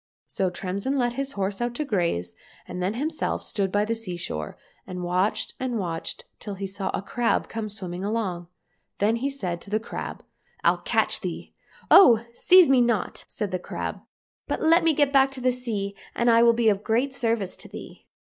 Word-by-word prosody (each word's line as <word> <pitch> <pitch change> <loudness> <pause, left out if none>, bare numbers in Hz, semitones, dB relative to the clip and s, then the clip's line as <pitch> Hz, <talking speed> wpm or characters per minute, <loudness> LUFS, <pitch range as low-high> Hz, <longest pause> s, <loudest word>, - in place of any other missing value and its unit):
" - - -
— - - -86
So 190 -1 -1
Tremsin 195 +9 -3
let 240 -2 +1
his 275 +2 -3
horse 195 +2 -2
out 240 0 -1
to 300 - -2
graze, 170 - -1 0.3
and 180 0 -4
he 200 +5 -1
himself 310 +2 -2
stood 195 -3 -1
by 205 +1 +2
the 225 - 0
sea 215 -6 -5
shore, 75 - -5 0.3
and 180 -1 -5
watched 190 +5 0
and 255 -2 -2
watched 170 -5 -3
till 205 -2 -6
he 195 +1 -4
saw 195 0 -4
a - - -4
crab 240 +3 0
come 220 -1 -4
swimming 185 -3 -6
along. 200 -5 -2 0.5
Then 215 +3 +2
he 270 +4 -1
said 180 -11 -4
to - - -10
the 215 +1 +1
crab, 220 - -6 0.4
"I'll - - +3
catch - - +1
thee."—*' - - -6 0.4
Oh! 235 - +8
seize 365 +6 +6
me 265 -2 +5
not! 235 -3 0
" - - -46
said 210 -3 -4
the 185 - -1
crab, - - -5 0.2
" - - -73
but - - -1
let 330 +2 +4
me 325 -1 +4
get 290 -1 +2
back 270 0 +6
into 270 -1 -6
the 255 0 +3
sea, 215 -6 -4 0.2
and 235 0 +3
I'll 230 +1 +6
be 230 -1 +1
of 200 0 0
great 245 +5 +1
service 230 -7 -1
to - - -9
thee." - - -11
220 Hz, 210 wpm, -25 LUFS, 190-245 Hz, 0.5 s, Oh